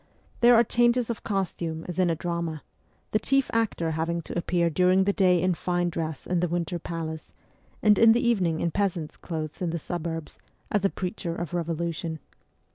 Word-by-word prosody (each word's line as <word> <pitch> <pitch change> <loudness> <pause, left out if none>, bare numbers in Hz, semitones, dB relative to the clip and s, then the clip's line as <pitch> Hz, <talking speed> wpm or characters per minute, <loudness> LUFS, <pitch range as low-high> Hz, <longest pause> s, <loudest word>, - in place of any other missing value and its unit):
There 240 0 +7
are 230 - +6
changes 240 +1 +2
of 230 - -7
costume 170 -5 -2
as 180 +1 -4
in 180 -1 +3
a 165 - +1
drama; 170 -2 -3 0.5
the 215 - +2
chief 275 +4 +1
actor 215 -8 0
having 165 +2 -2
to - - -7
appear 175 0 +1
during 180 +3 +3
the 200 +1 +1
day 185 -4 +4
in 185 +1 +2
fine 175 0 -1
dress 160 -3 -4
in 180 -1 0
the 180 - +1
Winter 170 0 -2
Palace, 160 -2 -6 0.5
and 210 -2 +5
in 225 -1 +8
the 240 +1 +2
evening 180 -9 +1
in 170 - 0
peasant's 175 -5 -1
clothes 155 -2 -6
in 175 - 0
the 170 - -2
suburbs, 165 -1 -5 0.3
as 205 -2 +1
a 195 - +4
preacher 180 -3 -4
of 175 -1 -5
revolution. 170 -1 -2
175 Hz, 190 wpm, -26 LUFS, 165-195 Hz, 0.5 s, in